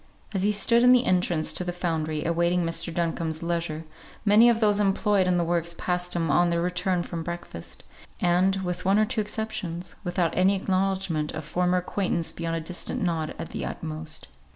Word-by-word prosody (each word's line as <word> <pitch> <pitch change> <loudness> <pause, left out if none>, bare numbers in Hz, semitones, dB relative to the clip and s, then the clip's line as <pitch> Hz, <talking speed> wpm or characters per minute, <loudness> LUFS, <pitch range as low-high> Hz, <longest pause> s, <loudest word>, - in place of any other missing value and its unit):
As 190 - -1
he 205 +2 +2
stood 235 +3 +4
in 250 +1 +7
the 250 0 +4
entrance 175 -3 +2
to - - +1
the 180 - -2
foundry, 160 -3 -2
awaiting 170 +2 +1
Mr. 165 +1 0
Duncombe's 165 -1 -2
leisure, 170 -2 -2 0.4
many 215 +3 +7
of 230 -1 +2
those 210 -2 +3
employed 200 -1 +2
in 180 -1 +2
the 175 - +2
works 170 0 -1
passed 180 0 -1
him 165 -3 0
on 175 +4 +4
their 170 0 +1
return 180 0 0
from 170 -1 -5
breakfast; 170 - -7 0.4
and 180 +2 +3
with 180 0 -3
one 195 +2 +3
or 215 - +4
two 225 0 -1
exceptions, 210 -5 -5
without 175 -2 0
any 190 +2 +4
acknowledgment 190 -5 -1
of - - -6
former 180 +3 +1
acquaintance 180 -2 -1
beyond 165 0 -3
a 165 - -2
distant 175 +2 -3
nod 165 -3 -1
at - - -6
the - - -5
utmost. 155 -1 -6
175 Hz, 190 wpm, -26 LUFS, 165-195 Hz, 0.4 s, in